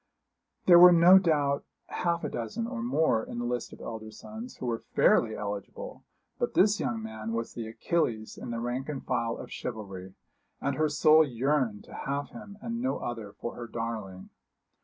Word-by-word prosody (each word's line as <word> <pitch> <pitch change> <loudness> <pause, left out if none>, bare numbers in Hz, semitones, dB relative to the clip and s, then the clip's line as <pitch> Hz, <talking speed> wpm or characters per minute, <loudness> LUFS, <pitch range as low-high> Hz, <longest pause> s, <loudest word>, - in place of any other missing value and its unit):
There 175 -2 +9
were 180 0 +10
no 175 +2 +8
doubt 145 -6 +1 0.3
half 170 -1 -1
a - - -1
dozen, 120 - -3
or 240 -1 -4
more, 160 - +2
in - - -7
the 120 - -2
list 120 -1 -2
of - - -12
elder 110 -1 -6
sons, 220 - -9
who - - -6
were 115 -2 -1 0.2
fairly 110 -2 +4
eligible. 100 -1 -6 0.4
But - - -1
this 205 +2 +4
young 115 -2 -2
man 110 0 -5
was 115 0 -3
the 115 -2 -5
Achilles 110 -2 -1
in - - -8
the 115 -1 -3
rank 125 +4 -3
and 140 -3 -5
file 115 -2 -1
of - - -9
chivalry, 95 -5 -6 0.4
and 140 -1 -1
her 155 +1 +1
soul 155 +1 +6
yearned 130 -4 0
to - - -14
have 140 +1 -3
him 210 -3 -11
and 235 0 -3
no 260 +1 0
other 115 -4 -5
for 120 - -6
her 120 - -7
darling. 110 -5 -5
120 Hz, 185 wpm, -29 LUFS, 110-170 Hz, 0.4 s, were